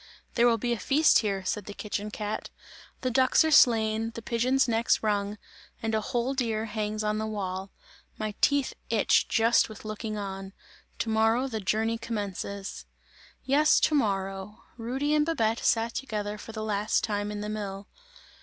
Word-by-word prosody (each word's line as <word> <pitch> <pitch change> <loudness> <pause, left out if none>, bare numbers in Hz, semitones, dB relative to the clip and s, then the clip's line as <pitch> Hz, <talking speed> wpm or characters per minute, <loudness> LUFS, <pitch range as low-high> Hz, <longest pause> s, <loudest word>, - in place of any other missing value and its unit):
"There 235 0 +4
will 230 -1 +4
be 240 +2 -2
a 235 - -4
feast 300 +7 +4
here," 195 -3 -2
said 205 +1 -2
the 205 - -8
kitchen 210 0 -4
cat, 210 0 -4 0.5
"the 255 - -1
ducks 260 +6 +4
are 315 - +1
slain, 225 -5 +4
the 230 - -7
pigeons 255 +4 +2
necks 230 0 +2
wrung, 205 -1 0 0.4
and 225 -1 -2
a 220 - +1
whole 240 +4 -1
deer 225 -4 -1
hangs 215 -1 -3
on 210 0 0
the 220 - -2
wall. 190 -2 -4 0.5
My 215 -1 -3
teeth 285 -2 +3 0.2
itch - - +3
just 230 0 +3
with 215 0 -11
looking 215 0 -4
on! 195 -1 -6 0.4
To 225 - -2
morrow 225 +4 +2
the 225 -4 -3
journey 220 +3 0
commences!" 200 -3 -5 0.6
Yes, 295 +3 +4
to 315 - +3
morrow! 195 -5 -1
Rudy 260 +6 -1
and 300 0 +4
Babette 230 -8 0
sat 230 0 +2
together 210 -5 -4
for 225 - -9
the 220 -1 -5
last 210 0 0
time 205 -1 -1
in 205 0 -4
the 210 - -4
mill. 200 -1 -5
220 Hz, 175 wpm, -28 LUFS, 205-235 Hz, 0.6 s, There